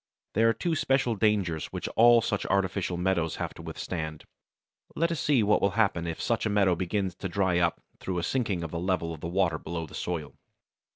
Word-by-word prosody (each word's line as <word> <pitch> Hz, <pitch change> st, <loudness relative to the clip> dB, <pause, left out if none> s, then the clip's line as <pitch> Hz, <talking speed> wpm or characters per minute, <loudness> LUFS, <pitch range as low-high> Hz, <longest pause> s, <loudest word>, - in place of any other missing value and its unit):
There 115 Hz, +2 st, +4 dB
are -, -, +3 dB
two 165 Hz, +9 st, -1 dB
special 135 Hz, -5 st, +1 dB
dangers 100 Hz, -7 st, +1 dB
which -, -, -5 dB
all 120 Hz, 0 st, +6 dB
such 105 Hz, -, -1 dB
artificial 95 Hz, -2 st, 0 dB
meadows 90 Hz, -3 st, 0 dB
have -, -, -4 dB
to -, -, -11 dB
withstand. 80 Hz, -3 st, -5 dB, 0.7 s
Let 170 Hz, +1 st, +1 dB
us 165 Hz, -, -2 dB
see 130 Hz, -4 st, +3 dB
what 105 Hz, +1 st, +3 dB
will 100 Hz, +1 st, +1 dB
happen 95 Hz, -6 st, +2 dB
if 80 Hz, -, -4 dB
such 115 Hz, -2 st, 0 dB
a -, -, -1 dB
meadow 100 Hz, -3 st, +3 dB
begins 95 Hz, +2 st, -1 dB
to 95 Hz, -, -4 dB
dry 90 Hz, -1 st, +1 dB
up 85 Hz, -1 st, +1 dB, 0.2 s
through 95 Hz, -1 st, -3 dB
a 85 Hz, -, -1 dB
sinking 100 Hz, -5 st, -1 dB
of 80 Hz, -, -5 dB
the 85 Hz, -, -3 dB
level 85 Hz, -2 st, -1 dB
of 80 Hz, -, -10 dB
the -, -, -3 dB
water 85 Hz, -3 st, +1 dB
below 85 Hz, -1 st, -4 dB
the 75 Hz, -, -15 dB
soil. 80 Hz, -6 st, -4 dB
95 Hz, 215 wpm, -28 LUFS, 85-110 Hz, 0.7 s, all